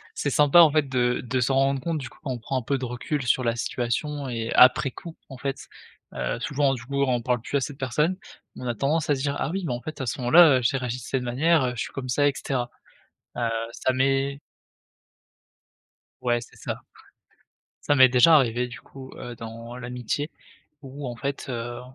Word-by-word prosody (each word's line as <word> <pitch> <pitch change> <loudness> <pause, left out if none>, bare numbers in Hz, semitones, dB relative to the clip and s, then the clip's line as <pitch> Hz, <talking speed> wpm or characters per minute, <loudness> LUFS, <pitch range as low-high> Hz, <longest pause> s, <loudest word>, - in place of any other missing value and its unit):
c'est 145 - -1
sympa, 150 +4 +5
en 165 -2 +9
fait, 145 -2 +1
de 125 -1 +1
de 125 +2 -1
se 125 +2 +1
rendre 135 0 +2
compte 165 +3 -2
du 130 - -7
coup, - - -21
quand 135 - -3
on 120 - -4
prend 130 +3 -3
un - - -7
peu 135 +4 -1
de 130 - -7
recul 125 +4 -3
sur 125 +1 +2
la 115 0 +1
situation 135 +5 -2
et 115 -2 -3
après 135 +2 +6
coup, 165 +5 -10
en 135 - -9
fait, 135 +1 -5 0.4
heu, - - -3
souvent, 140 -1 +1
du 125 -3 -6
coup, 140 +1 -2
on 125 -3 +1
parle 125 +1 0
plus 130 - -5
à 140 - +2
cette 140 +1 -5
personne, 150 +8 0 0.4
mais - - -9
on - - -3
a 120 - -1
tendance 150 +6 0
à 145 - +4
se 135 - -5
dire: 140 0 -1
«Ah - - -1
oui, 190 +3 -3
mais 145 - -1
en 120 - -5
fait, 155 +2 -7
à - - -2
ce 120 - -3
moment-là, 135 +1 +6
j'ai 130 +4 +1
réagi 125 -2 -2
de 130 - -10
cette 130 0 -2
manière, 145 +6 +2
heu, - - -1
je - - -2
suis - - -9
comme 130 -2 -5
ça», 145 +3 +3
et 140 - +2
cetera. 125 -3 -2 0.7
Heu, 120 -1 0 0.2
ça 130 - 0
m'est 135 +1 +1 1.8
Ouais 120 -1 +1
c'est - - -14
ça, - - -5 1.0
ça 145 - +1
m'est 130 -2 +7
déjà 125 +6 +6
arrivé, 125 -3 +1
du 120 - -10
coup, 135 -1 -12
heu, 120 - -7
dans 115 +1 -9
l'amitié 125 +4 -4 0.5
où 135 0 -8
en 120 -1 -5
fait, 140 +3 -4
heu, 120 -1 -4
130 Hz, 225 wpm, -25 LUFS, 120-140 Hz, 1.8 s, en